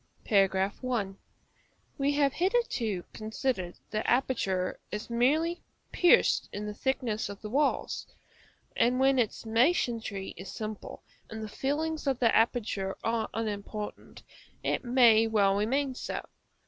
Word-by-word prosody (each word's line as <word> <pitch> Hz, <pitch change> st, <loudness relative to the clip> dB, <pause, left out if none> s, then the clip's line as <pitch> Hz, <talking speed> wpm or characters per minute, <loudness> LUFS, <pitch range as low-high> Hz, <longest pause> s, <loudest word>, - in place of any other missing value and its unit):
§ 195 Hz, +4 st, +2 dB
I. 195 Hz, -4 st, -2 dB, 0.9 s
We 280 Hz, +1 st, +2 dB
have 285 Hz, -2 st, +2 dB
hitherto 335 Hz, -, 0 dB
considered 215 Hz, -4 st, -3 dB
the 215 Hz, +1 st, -1 dB
aperture 230 Hz, -8 st, 0 dB
as 210 Hz, +3 st, -5 dB
merely 310 Hz, +9 st, +2 dB, 0.3 s
pierced 355 Hz, -, +4 dB
in 205 Hz, +1 st, -5 dB
the 210 Hz, -, -4 dB
thickness 230 Hz, -3 st, -1 dB
of 200 Hz, 0 st, -8 dB
the 210 Hz, -, -6 dB
walls; 290 Hz, +4 st, 0 dB, 0.7 s
and 250 Hz, +2 st, +2 dB
when 265 Hz, 0 st, +4 dB
its 230 Hz, -1 st, -1 dB
masonry 225 Hz, -, +1 dB
is 190 Hz, +2 st, -8 dB
simple 215 Hz, -1 st, -7 dB, 0.3 s
and 220 Hz, 0 st, -6 dB
the -, -, -4 dB
fillings 300 Hz, +7 st, -2 dB
of 270 Hz, -2 st, +2 dB
the 235 Hz, -2 st, +3 dB
aperture 215 Hz, -4 st, +1 dB
are 225 Hz, -1 st, 0 dB
unimportant, 210 Hz, -1 st, -5 dB, 0.4 s
it -, -, 0 dB
may 240 Hz, -3 st, +5 dB
well 205 Hz, -3 st, +3 dB
remain 260 Hz, +7 st, 0 dB
so. -, -, -5 dB
225 Hz, 130 wpm, -29 LUFS, 210-265 Hz, 0.9 s, may